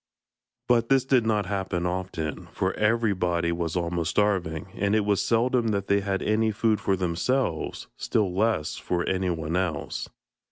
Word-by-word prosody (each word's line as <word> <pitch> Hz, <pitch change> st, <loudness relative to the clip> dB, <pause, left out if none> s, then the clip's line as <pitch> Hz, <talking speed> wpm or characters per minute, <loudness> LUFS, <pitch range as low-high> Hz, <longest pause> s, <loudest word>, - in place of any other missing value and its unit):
But 115 Hz, -1 st, +3 dB
this 135 Hz, -1 st, +4 dB
did 125 Hz, -4 st, +3 dB
not 105 Hz, -2 st, +1 dB
happen 95 Hz, -3 st, -2 dB
often, 90 Hz, -4 st, -3 dB
for -, -, 0 dB
everybody 100 Hz, -6 st, +1 dB
was 85 Hz, -1 st, -2 dB
almost 85 Hz, -1 st, -1 dB
starving, 95 Hz, -6 st, 0 dB
and 100 Hz, +1 st, +1 dB
it 105 Hz, -2 st, +2 dB
was 100 Hz, -1 st, +2 dB
seldom 120 Hz, +1 st, +2 dB
that 100 Hz, -2 st, 0 dB
they 100 Hz, 0 st, +3 dB
had 95 Hz, -1 st, -2 dB
any 110 Hz, +1 st, +2 dB
food 110 Hz, -1 st, +1 dB
for 95 Hz, -, +1 dB
themselves, 90 Hz, +3 st, -1 dB
still 100 Hz, -5 st, 0 dB
less 105 Hz, -5 st, 0 dB
for 85 Hz, -1 st, -2 dB
anyone 85 Hz, -4 st, -1 dB
else. 90 Hz, -6 st, -2 dB
95 Hz, 155 wpm, -26 LUFS, 85-110 Hz, -, this